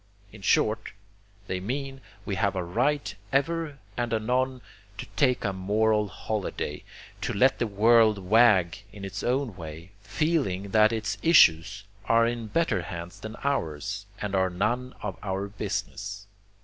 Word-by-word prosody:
In 110 - -12
short, 110 +2 +1 0.5
they 95 -2 -3
mean 135 +7 -4
that 135 - -21 0.2
we 100 - -3
have 100 0 0
a 90 - -1
right 125 +12 0 0.2
ever 150 +1 0 0.2
and 120 -1 -2
anon 125 +3 0 0.4
to 125 - -5
take 125 0 +2
a 100 - 0
moral 105 +3 +1
holiday, 100 -7 -4 0.4
to - - -1
let 130 +7 +3
the 120 - +1
world 110 +1 +5
wag 100 -2 +4
in 100 -1 -8
its 100 +1 -5
own 125 -3 -1
way, 80 +1 -9
feeling 115 - -1
that 110 +1 +5
its 110 -2 -2
issues 100 - +5 0.2
are 115 +1 +4
in 115 -1 -2
better 115 - +1
hands 85 +3 -7
than 110 +1 -7
ours 100 - -2
and 105 -1 -4
are 95 -1 +2
none 120 +8 -1
of 95 -3 -4
our 95 0 -2
business. 100 0 -5
105 Hz, 150 wpm, -27 LUFS, 95-120 Hz, 0.5 s, world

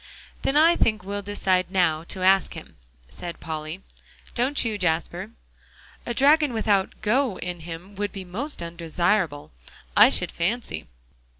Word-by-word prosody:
"Then 275 - +1
I 330 +3 +6
think 215 - +1
we'll 200 +1 -4
decide 190 -2 0
now 175 -5 +2
to 185 +2 -5
ask 190 0 +4
him," - - -11 0.3
said 170 - -8
Polly, 155 +3 -6 0.5
"don't 255 +3 +1
you, 215 -2 -2
Jasper?" 175 +2 -1 0.8
"A 240 - -1
dragon 290 0 +4
without 205 -4 +1
'go' 235 0 +1
in 180 -1 -5
him 170 +4 -9
would 205 0 -2
be 195 -2 -7
most 230 - -4
undesirable, 170 -1 -1 0.4
I - - +8
should - - +1
fancy. 170 - -2
190 Hz, 140 wpm, -25 LUFS, 170-220 Hz, 0.8 s, I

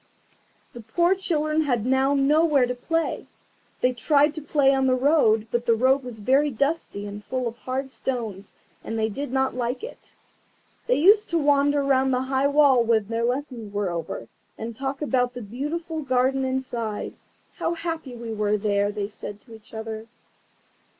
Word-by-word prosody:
The 240 - -9
poor 345 - +2
children 315 -5 0
had 245 -7 0
now 265 +2 +2
nowhere 290 0 +4
to 250 - -2
play. 330 +7 -2 0.5
They 250 0 +3
tried 290 +4 +3
to 310 - -6
play 280 -2 +3
on 265 -1 +2
the 255 - +3
road, 255 -6 +3
but 240 0 -1
the 230 - +5
road 260 +4 +3
was 245 -3 -7
very 265 +7 +2
dusty 280 -5 -2
and 205 0 -7
full 255 +1 -2
of 230 - -5
hard 265 +1 -4
stones, 220 -8 -4 0.3
and 225 - -4
they 220 0 +1
did 275 +4 -5
not 265 0 +1
like 250 - -3
it. 475 - -10 0.7
They - - +3
used 410 +7 +5
to 340 - +1
wander 285 -1 +3
round 265 -1 +2
the 255 0 +1
high 265 +1 +1
wall 280 -4 +5
when 225 -3 +1
their 230 0 -1
lessons 245 -4 -3
were 200 -3 -1
over, 165 -8 -5 0.3
and 225 +1 -6
talk 270 +3 -3
about 250 -3 0
the 245 - -5
beautiful 310 - -4
garden 265 0 +1
inside. 245 -5 -3 0.4
"How 340 - -1
happy 325 -6 -5
we 230 -1 -6
were 210 0 +1
there," 205 -1 +1
they 205 -1 -3
said 205 0 -8
to 230 - -16
each 220 -1 -15
other. 220 0 -6
260 Hz, 175 wpm, -24 LUFS, 225-285 Hz, 0.7 s, the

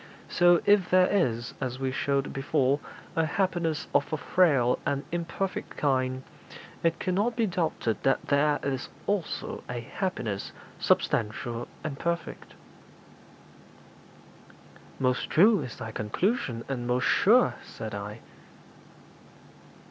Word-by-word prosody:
So 175 -1 +5
if 205 -3 +4
there 185 0 +6
is, 120 - 0
as 130 -1 -2
we 135 0 -1
showed 140 +1 -1
before, 135 0 +1 0.4
a 165 - +3
happiness 170 -3 0
of - - +2
a 155 - 0
frail 145 -7 +3
and 140 0 -1
imperfect 175 +3 -3
kind, 130 -2 0 0.6
it 165 0 +1
cannot 205 +6 0
be 230 -1 +2
doubted 165 - -1
but 135 - +3
there 145 +1 +2
is 135 -2 -2 0.2
also 200 -5 -2
a 125 -1 -3
happiness 115 - -3 0.3
substantial 115 +2 0 0.2
and 140 -3 -4
perfect.' 170 0 -3 2.4
'Most 125 -1 0
true 205 +3 +5
is 125 -5 -7
thy 110 - -6
conclusion, 120 - -1
and 125 -3 -3
most 125 +1 +1
sure,' 240 +5 +4
said 110 -2 -8
I. 105 +2 -6
140 Hz, 120 wpm, -28 LUFS, 125-180 Hz, 2.4 s, there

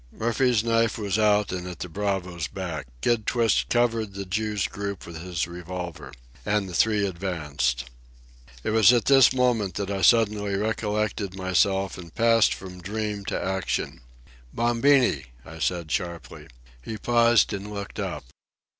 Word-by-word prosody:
Murphy's 120 0 +1
knife 115 -2 +1
was 105 -1 -1
out 105 -1 +3
and 90 -1 -4
at 90 -2 -7
the 90 - -5
bravo's 90 -3 -2
back. 85 -7 -5
Kid 115 -3 +1
Twist 115 -2 +2
covered 115 -4 +1
the 100 0 -5
Jew's 105 +1 -1
group 100 -2 -5
with 85 -1 -8
his 90 -2 -2
revolver. 85 -4 -7 0.3
And 105 -1 0
the 90 - -8
three 105 +3 +2
advanced. 75 -9 -2 0.8
It - - -1
was 110 -1 +6
at 120 -2 +2
this 135 -2 +6
moment 125 -6 +1
that 100 -1 -3
I 95 -1 -2
suddenly 105 -3 +3
recollected 105 -2 -2
myself 95 +1 +1
and 85 -2 -11
passed 115 -1 +4
from 90 -1 -10
dream 105 +1 -4
to - - -2
action. 95 -8 -2 0.5
"Bombini!" 120 - +3 0.2
I 80 0 -10
said 85 -1 -1
sharply. 85 -2 -4 0.3
He 110 - -6
paused 120 0 +3
and 100 +1 -5
looked 100 -1 -6
up. - - -4
100 Hz, 150 wpm, -25 LUFS, 90-110 Hz, 0.8 s, was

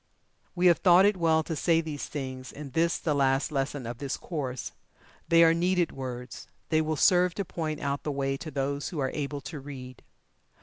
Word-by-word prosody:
We 180 0 +1
have 175 -2 +6
thought 180 +1 +6
it 205 0 +4
well 160 -3 +2
to 160 - -4
say 165 +2 +2
these 155 -3 -4
things 130 -3 -6
in 145 -2 -9
this 165 +4 +1
the 155 - -1
last 135 +1 +2
lesson 135 -2 -2
of 115 0 -6
this 140 -2 -3
course. 130 -7 -4 0.6
They 165 0 +6
are 165 0 +6
needed 175 +1 +1
words 125 -2 -7 0.2
they 155 -1 +3
will 155 0 -1
serve 180 +2 +4
to 200 - -2
point 155 -3 -4
out 140 0 -2
the 150 - -3
way 135 -1 -1
to 155 +3 -7
those 140 0 -2
who 170 - -7
are 135 -2 0
able 145 -1 -3
to 145 +2 -7
read. 130 -3 -9
150 Hz, 205 wpm, -28 LUFS, 135-165 Hz, 0.6 s, have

